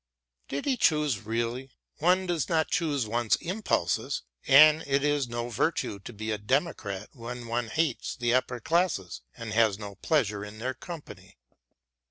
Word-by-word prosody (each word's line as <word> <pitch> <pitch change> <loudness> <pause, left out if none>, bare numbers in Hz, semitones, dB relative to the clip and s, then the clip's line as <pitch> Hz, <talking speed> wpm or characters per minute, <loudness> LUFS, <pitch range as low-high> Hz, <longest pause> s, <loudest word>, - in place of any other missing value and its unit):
Did 140 - -4
he 265 -2 +1
choose 150 - +2
really? 120 +4 -2 0.3
One 180 +4 +3
does 175 -5 -1
not 160 -2 +1
choose 145 -7 +1
one's 115 +1 +1
impulses, 175 - -1 0.2
and 155 +3 +8
it 140 0 +2
is 145 -3 +1
no 120 0 -4
virtue 110 -3 -1
to 100 - -9
be 110 0 -4
a 105 - -2
democrat 105 - -1
when 120 -1 -7
one 115 0 -1
hates 155 0 -1
the 120 -1 0
upper 125 -1 +1
classes 160 - 0 0.2
and 115 -3 -5
has 110 -3 +3
no 100 -1 -7
pleasure 105 -5 0
in 105 +1 -9
their 130 +4 -2
company. 155 - -10
125 Hz, 160 wpm, -28 LUFS, 110-155 Hz, 0.3 s, and